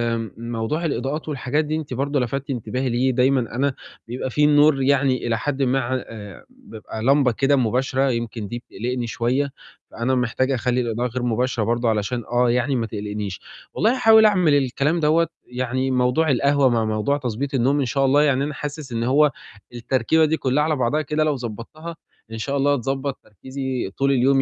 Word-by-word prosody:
آمم 115 -3 -5
موضوع 115 +8 -3
الإضاءات 145 +3 -3
والحاجات 145 +2 -1
دي 155 - -2
أنتِ 155 -5 -5
برضه 140 +3 -1
لَفتتِ 135 +3 -3
انتباهي 130 +1 -2
ليه، 125 +2 +1
دايمًا 125 -2 +1
أنا 140 +1 +1 0.3
بيبقى 125 +2 -4
في 150 +4 +1
النور 145 -1 +4
يعني 135 -2 +2
إلى 115 -1 +1
حدِ 140 +3 -2
ما 130 +1 +2
ع 125 +1 -2
آآ 110 - -8
بابقى 165 - -10
لَمبَة 135 -1 +4
كده 135 +5 +2
مباشرة، 130 +2 +1
يمكن 115 -3 -3
دي 120 +3 -5
بتقلقني 120 +2 -4
شوية، 125 +4 -1 0.4
فأنا 125 +3 -1
محتاجة 130 +2 0
أخلّي 125 0 0
الإضاءة 120 +1 -1
غير 125 +1 -4
مباشرة 120 0 0
برضه 120 +1 0
علشان 110 +2 -1
آه، 120 0 +3
يعني 125 +3 +1
ما 115 -2 0
تقلقنيش. 105 -2 -5 0.3
والله 220 - +2
هاحاول 220 -3 +6
أعمل 185 -8 +4
الكلام 145 +4 +1
دوّة، 160 +2 +3 0.2
يعني 130 +1 -2
موضوع 125 +5 +2
القهوة 140 +1 +3
مع 115 -2 +1
موضوع 110 +6 0
تضبيط 135 +1 -4
النوم 135 +3 +2
إن 135 - +1
شاء 135 +3 +1
الله، 145 +3 +4
يعني 140 -2 +2
أنا 150 - -3
حاسس 145 -1 -6
إن 115 0 -2
هو 140 +4 +4 0.4
التركيبة 130 +6 +1
دي 155 +1 0
كُلّها 135 +3 +1
على 155 0 +1
بعضها 135 +4 0
كده 155 +2 0
لو 150 -2 +1
ضبّطتها 130 +8 -7 0.4
إن 115 - -5
شاء 140 +5 -2
الله 145 +1 +2
هتضبّط 135 +1 -2
تركيزي 130 +1 -5
طول 140 0 +2
اليوم 135 +1 +3
130 Hz, 185 wpm, -22 LUFS, 120-145 Hz, 0.4 s, هاحاول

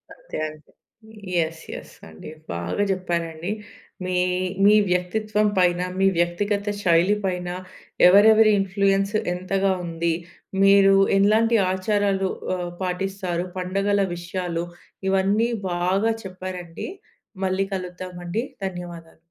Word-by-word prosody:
అంతే. - - -9
అంతే. 155 0 -16 0.6
Yes, 165 -1 0
yes - - -9 0.2
అండి. 80 - -11 0.2
బాగా 85 - -1
చెప్పారండి. 170 -1 -2 0.5
మీ 185 0 -1 0.5
మీ 210 - +7 0.2
వ్యక్తిత్వం 210 +4 +1
పైన, 180 -1 +3 0.2
మీ 195 - +4
వ్యక్తిగత 200 +4 0 0.2
శైలి 175 +3 +4
పైన 180 -1 -2 0.6
ఎవరెవరి 215 +3 +7
ఇన్‌ఫ్లూయెన్స్ 195 +1 +1 0.2
ఎంతగా 190 +2 0
ఉంది, 165 0 -1 0.5
మీరూ 195 0 +6 0.2
ఎలాంటి 220 +3 +4
ఆచారాలు 195 0 0 0.3
ఆహ్, 175 -1 -4
పాటిస్తారు, 185 -1 -2
పండగల 195 +2 +1
విషయాలు, 175 -1 -3 0.4
ఇవన్నీ 200 +5 +2 0.2
బాగా 190 +6 +1
చెప్పారండి. 185 -2 -6 0.6
మళ్ళీ 190 +1 0
కలుద్దామండి. 180 +2 -4 0.2
ధన్యవాదాలు. 175 -3 -7
185 Hz, 100 wpm, -23 LUFS, 175-200 Hz, 0.6 s, మీ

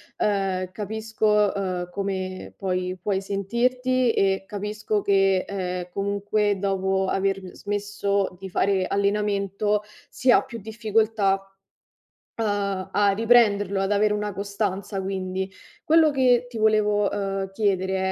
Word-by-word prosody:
ehm, 190 -3 0
capisco, 210 +1 0
uhm, 185 -3 -3
come 190 -1 -4
puoi 185 -1 -2
puoi 195 0 0
sentirti 245 +5 0
e 195 0 +1
capisco 210 0 -2
che, 195 -1 +3
ehm, 180 -2 -4
comunque, 200 +1 0
dopo 190 0 0
aver 195 -1 -1
smesso 200 -2 -2
di 190 - -7
fare 190 0 +1
allenamento, 200 0 0 0.3
si 260 -1 +2
ha - - +6
più 230 - -8
difficoltà 220 -1 +1 1.1
a 200 -3 -1
a 205 0 +4
riprenderlo, 205 -3 +3
ad 195 +1 0
avere 210 +1 +3
una 210 0 -2
costanza 200 0 -3
quindi; 190 0 -3 0.3
quello 320 0 +5
che 250 -3 +3
ti 245 -2 -8
volevo, 210 -2 +3
uhm, 195 -1 -2
chiedere 190 -2 0
200 Hz, 120 wpm, -24 LUFS, 195-210 Hz, 1.1 s, ha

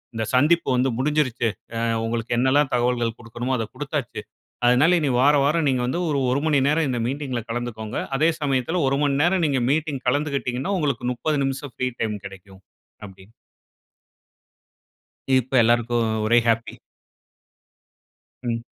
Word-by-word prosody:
இந்த 110 0 -2
சந்திப்பு 165 +6 +3
வந்து 125 +1 +2
முடிஞ்சிடுச்சு. 130 -5 +1 0.6
உங்களுக்கு 115 0 -3
என்னலாம் 135 +2 +2
தகவல்கள் 120 -2 0
குடுக்கணுமோ 120 +2 -3
அத 115 - -2
குடுத்தாச்சு. - - -4 0.4
அதனால 130 +9 +5
இனி 150 - 0
வாராவாரம் 145 +3 +3
நீங்க 130 -2 0
வந்து 170 +7 -1
ஒரு 145 -2 0
01:00 135 - +1
மணி 150 -3 +3
நேரம் 155 0 +2
இந்த 125 -2 -1
மீட்டிங்க்ல 135 -2 -3
கலந்துக்கோங்க. 115 -2 -4 0.2
அதே 160 +3 +3
சமயத்துல 145 +4 0
01:00 135 - 0
மணி 140 -1 +1
நேரம் 175 0 +2
நீங்க 135 -4 0
மீட்டிங் 150 -3 -1
கலந்துக்கிட்டீங்கன்னா, 140 +2 -1
உங்களுக்கு 140 -6 -1
00:30 145 +5 -1
நிமிஷம் 135 0 -4
ஃப்ரீ 130 - -2
டைம் 110 -2 -1
கிடைக்கும், 95 0 -12 0.4
அப்டீன்னு. 95 +2 -15 2.1
இப்போ 130 +1 -2
எல்லாருக்கும் 120 0 +2 0.2
ஒரே 120 +2 +5
ஹாப்பீ. 115 0 0 1.7
ம். 115 -1 -2
130 Hz, 135 wpm, -23 LUFS, 120-145 Hz, 2.1 s, அதனால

